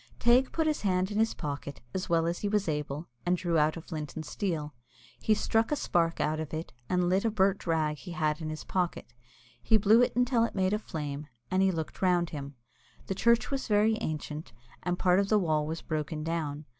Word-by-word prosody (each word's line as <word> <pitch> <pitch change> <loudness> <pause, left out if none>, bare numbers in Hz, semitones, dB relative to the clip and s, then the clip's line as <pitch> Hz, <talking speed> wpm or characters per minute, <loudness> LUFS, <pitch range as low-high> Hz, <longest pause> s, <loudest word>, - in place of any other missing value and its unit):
Teig 245 +3 +4
put 320 - 0
his 305 -1 0
hand 185 -1 +1
in 205 - -1
his 225 0 +2
pocket, 145 -2 -5
as 190 0 -3
well 165 -1 +3
as 170 +1 -1
he 205 - -1
was 205 -2 +1
able, 150 +1 -3 0.2
and 180 +1 +2
drew 170 -2 +1
out 155 +2 +2
a - - -6
flint 155 -3 -6
and 155 - -5
steel. 160 -7 -3 0.5
He 215 - +3
struck 225 +3 +1
a - - +3
spark 165 - +1
out 155 +1 0
of 160 0 -4
it, 160 -3 -5 0.2
and 180 -1 +2
lit 185 +2 +2
a 230 - +2
burnt 195 -3 +1
rag 155 -2 +1
he 175 +3 -8
had 155 -2 0
in 155 - -3
his 155 -1 -5
pocket. 180 -9 -2 0.5
He 220 - +4
blew 215 +3 +5
it 245 - +2
until 245 -1 +3
it 230 - -2
made 190 +1 +2
a 210 - +1
flame, 150 -6 -5 0.2
and 185 - +3
he 195 - +4
looked 160 -3 -5
round 175 -2 +2
him. 140 -2 -6 0.5
The - - -2
church 235 +6 +3
was 275 -1 -2
very 215 0 +4
ancient, 155 -1 -4 0.3
and 180 0 -1
part 180 +1 +4
of 200 0 0
the 215 - +5
wall 155 -6 +1
was 160 +1 -4
broken 155 -1 -3
down. 155 -2 -3
175 Hz, 225 wpm, -29 LUFS, 155-205 Hz, 0.5 s, blew